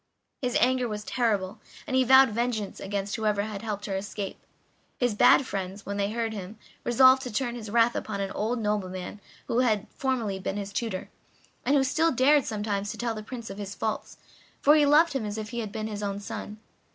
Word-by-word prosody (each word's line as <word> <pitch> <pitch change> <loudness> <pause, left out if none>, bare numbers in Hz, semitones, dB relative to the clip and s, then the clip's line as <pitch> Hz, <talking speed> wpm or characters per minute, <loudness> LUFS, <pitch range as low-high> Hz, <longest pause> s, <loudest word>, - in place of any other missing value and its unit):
His 250 -2 -1
anger 250 +1 +3
was 210 -1 -4
terrible, 210 -5 -1 0.3
and 260 - -2
he 260 - +5
vowed 265 +1 +7
vengeance 225 -2 -2
against 200 +1 -3
whoever 210 -2 +1
had 210 -2 -5
helped 210 -2 -4
her 200 - -5
to 190 - 0
escape. 200 0 -6 0.5
His 245 -3 +1
bad 255 +5 +6
friends, 195 -1 -5
when 200 0 -4
they 200 0 0
heard 225 0 -2
him, 200 +1 -7 0.3
resolved 260 +2 +6
to 250 -2 -5
turn 240 +2 -1
his 225 -3 -7
wrath 235 +2 +3
upon 205 -2 -3
an 195 -1 -2
old 225 +4 -1
nobleman 205 -3 -3 0.2
who 235 - 0
had 220 -5 +2
formerly 235 -8 -1
been 195 +1 -3
his 200 0 -5
tutor; 220 -5 -3 0.5
and 285 - +2
who 275 - +4
still 320 +5 +2
dared 275 +2 +4
sometimes 205 -1 -2
to 220 - -5
tell 235 -1 -1
the 215 - -6
Prince 230 0 -7
of 195 - -8
his 200 0 -6
faults, 220 - -3 0.4
for 295 +2 +6
he 295 -2 +5
loved 305 +2 +5
him 270 -4 -1
as 210 0 -4
if 215 -1 -5
he 240 - -3
had 215 -3 -4
been 215 +1 -4
his 210 -1 -5
own 200 -1 -2
son. 210 0 -7
215 Hz, 215 wpm, -27 LUFS, 205-245 Hz, 0.5 s, vowed